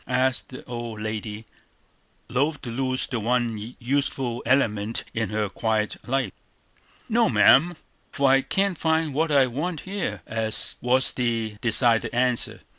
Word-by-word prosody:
asked 130 0 +1
the 130 - -9
old 120 -3 -6
lady, 110 0 -5 0.8
loth 140 +6 0
to 120 - -5
lose 130 +1 -1
the 125 - -3
one 115 -1 -1
youthful 130 -1 -1
element 115 -4 +1
in 110 -3 -1
her 105 0 -1
quiet 110 +1 -1
life. 130 -7 0 0.7
"No, - - +3
ma'am, 170 +7 +5 0.4
for 140 - +1
I 135 0 +5
can't 195 +2 0
find 160 -2 +1
what 155 +3 0
I 140 -2 +5
want 150 +6 -3
here," 180 - -4 0.6
was 130 +2 +3
the 115 -3 -1
decided 115 0 +3
answer. 125 -1 +1
125 Hz, 135 wpm, -25 LUFS, 110-135 Hz, 0.8 s, ma'am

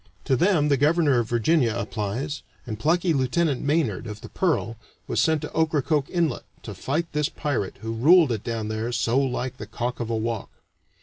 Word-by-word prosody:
To 135 - +3
them 160 0 +3
the 140 - +3
Governor 145 -2 +3
of 115 -2 -2
Virginia 120 0 +2
applies, 120 +9 -3 0.2
and 110 -3 -5
plucky 165 +6 +2
Lieutenant 140 +2 +1
Maynard, 140 - 0
of 105 -1 -7
the - - -9
Pearl, 155 -10 0 0.3
was - - 0
sent 160 -2 +2
to - - -6
Ocracoke 155 -2 +1
Inlet 170 -3 0 0.2
to 105 - -6
fight 140 - -1
this 150 -1 0
pirate 135 -11 -3
who 115 0 -3
ruled 155 +5 +5
it 110 -3 -2
down 115 -2 -3
there 110 +2 -2
so 120 +1 +1
like 130 -1 -2
the - - -7
cock 120 0 -3
of 120 -1 -3
a 115 - 0
walk. 110 -1 -3
130 Hz, 190 wpm, -25 LUFS, 115-155 Hz, 0.3 s, ruled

